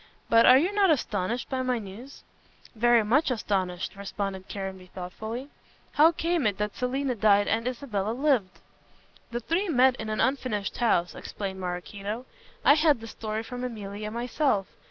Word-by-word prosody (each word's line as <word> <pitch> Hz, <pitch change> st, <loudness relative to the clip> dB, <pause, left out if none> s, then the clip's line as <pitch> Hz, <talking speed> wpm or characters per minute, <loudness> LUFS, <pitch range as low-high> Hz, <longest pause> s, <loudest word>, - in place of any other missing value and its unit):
But 230 Hz, 0 st, +6 dB
are 255 Hz, -, +9 dB
you 340 Hz, +8 st, +2 dB
not 405 Hz, -2 st, +4 dB
astonished 235 Hz, -, 0 dB
by 260 Hz, -1 st, -2 dB
my 255 Hz, -1 st, 0 dB
news?" 225 Hz, +6 st, -10 dB, 0.5 s
"Very 235 Hz, 0 st, +4 dB
much 270 Hz, +10 st, +2 dB
astonished," 190 Hz, -7 st, -2 dB
responded 195 Hz, -1 st, -5 dB
Caranby 190 Hz, -2 st, -6 dB
thoughtfully, 220 Hz, +9 st, -6 dB, 0.4 s
"how 315 Hz, +3 st, +6 dB
came 335 Hz, -5 st, 0 dB
it 200 Hz, -2 st, -1 dB
that 210 Hz, 0 st, -2 dB
Selina 260 Hz, +1 st, -1 dB
died 205 Hz, -2 st, +4 dB
and 230 Hz, +2 st, 0 dB
Isabella 230 Hz, -6 st, -2 dB
lived?" 250 Hz, -8 st, +1 dB, 0.7 s
"The 240 Hz, 0 st, -4 dB
three 345 Hz, -, 0 dB
met 260 Hz, -3 st, +4 dB
in 220 Hz, -, -5 dB
the 215 Hz, -, -2 dB
unfinished 255 Hz, -7 st, -3 dB
house," 180 Hz, -7 st, +2 dB
explained 190 Hz, -2 st, -6 dB
Maraquito. 195 Hz, +6 st, -5 dB, 0.4 s
"I 280 Hz, -, +8 dB
had 300 Hz, -3 st, +3 dB
the 225 Hz, -, -9 dB
story 220 Hz, -1 st, -4 dB
from 245 Hz, +2 st, -6 dB
Emilia 210 Hz, -3 st, -5 dB
myself. 235 Hz, -1 st, 0 dB
230 Hz, 155 wpm, -27 LUFS, 200-260 Hz, 0.7 s, are